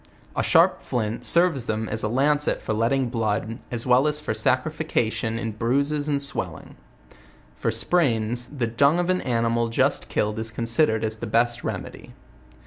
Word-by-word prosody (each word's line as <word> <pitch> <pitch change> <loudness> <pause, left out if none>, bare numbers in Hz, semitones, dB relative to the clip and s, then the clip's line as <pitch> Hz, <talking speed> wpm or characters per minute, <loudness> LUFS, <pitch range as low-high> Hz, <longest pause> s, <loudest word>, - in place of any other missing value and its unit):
A - - +1
sharp - - +4
flint 110 -1 -3
serves 170 -8 +3
them 110 0 -2
as 110 +1 -3
a - - 0
lan 140 +6 +2
cet 150 - -1
for - - -3
letting 120 +4 +1
blood, 115 0 -2
as 120 -2 -4
well 130 +3 +4
as 150 0 0
for 150 -7 -3
sacrification 120 -2 0
in 115 -1 -3
bruises 140 +7 0
and 140 -1 +1
swellings. 115 - -3 0.9
For - - 0
sprains, 120 -8 0
the 130 -5 -2
dung 140 +8 +3
of 175 +1 +1
an 185 - 0
animal 115 -1 0
just 115 - 0
kill 105 - 0
ed 105 - -6
is 110 0 -3
considered 115 +1 +1
as 110 0 -2
the - - -5
best 120 0 +1
remedy. - - -6
120 Hz, 175 wpm, -24 LUFS, 110-140 Hz, 0.9 s, sharp